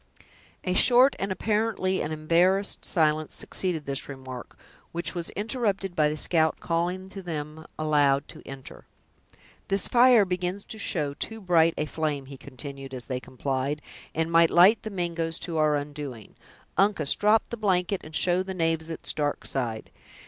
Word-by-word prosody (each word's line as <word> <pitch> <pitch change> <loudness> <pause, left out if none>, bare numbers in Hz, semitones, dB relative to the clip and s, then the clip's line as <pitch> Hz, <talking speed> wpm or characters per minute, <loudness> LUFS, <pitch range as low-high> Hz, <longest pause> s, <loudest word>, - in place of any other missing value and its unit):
A 180 - 0
short 250 +7 +5
and 195 0 -2
apparently 210 -1 0
an 155 - -3
embarrassed 175 +6 +1
silence 155 -2 +1
succeeded 170 -6 -2
this 140 0 -3
remark, 130 -3 -9 0.3
which 170 +1 -3
was 170 -2 -4
interrupted 205 -3 -1
by 150 -1 +3
the 155 - -3
scout 160 0 +2
calling 175 +3 -1
to 195 0 -8
them, 155 -2 -6
aloud, 145 -2 +2
to - - -10
enter. 135 -1 -11 0.8
"This 195 -1 +2
fire 245 -3 +6
begins 180 +2 -2
to 220 - -6
show 150 -8 -2
too 225 +9 -4
bright 170 -4 +3
a 150 - 0
flame," 150 -3 -2
he 135 +1 -10
continued, 135 0 -8
as 125 - -6
they 130 -2 -3
complied, 135 +3 -3 0.4
"and 160 +1 0
might 165 0 +6
light 190 +6 +6
the 220 - -5
Mingoes 170 -4 -2
to 165 -2 -3
our 155 -1 +3
undoing. 145 -6 -6 0.4
Uncas, 195 -7 +3
drop 210 +2 +2
the - - -4
blanket, 190 -2 +1
and 155 +1 -10
show 180 0 +3
the 190 0 -5
knaves 165 -1 0
its 165 - -3
dark 145 -1 -2
side. 120 -5 -3
165 Hz, 165 wpm, -26 LUFS, 145-190 Hz, 0.8 s, fire